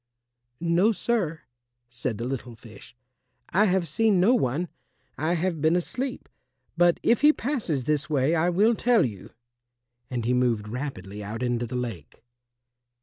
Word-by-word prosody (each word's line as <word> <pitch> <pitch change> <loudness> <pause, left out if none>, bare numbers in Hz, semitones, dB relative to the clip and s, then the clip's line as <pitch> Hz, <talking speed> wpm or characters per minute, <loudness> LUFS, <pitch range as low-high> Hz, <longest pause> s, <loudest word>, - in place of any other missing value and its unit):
"No, 175 +6 +3
sir," 190 -6 -1 0.5
said 120 -2 -4
the 115 - -4
little 125 -2 -5
fish, 115 +1 -14 0.5
"I 205 +4 +3
have 185 -3 +1
seen 205 +5 +2
no 205 +8 +5
one; 170 - 0 0.5
I 155 +5 0
have 170 -2 -1
been 160 +2 +3
asleep. 250 +9 -3 0.5
But 175 0 +3
if 235 - +3
he 300 +1 +7
passes 230 - -2
this 150 +2 -1
way 145 +1 +2
I 170 +1 +2
will 205 +6 +3
tell 235 - +3
you," 100 -6 -7 0.8
and 120 -3 -3
he 125 - +2
moved 120 -4 +1
rapidly 110 -5 -6
out 110 +4 -5
into 120 -1 -1
the 125 +2 -4
lake. 115 - -6
155 Hz, 150 wpm, -26 LUFS, 120-185 Hz, 0.8 s, he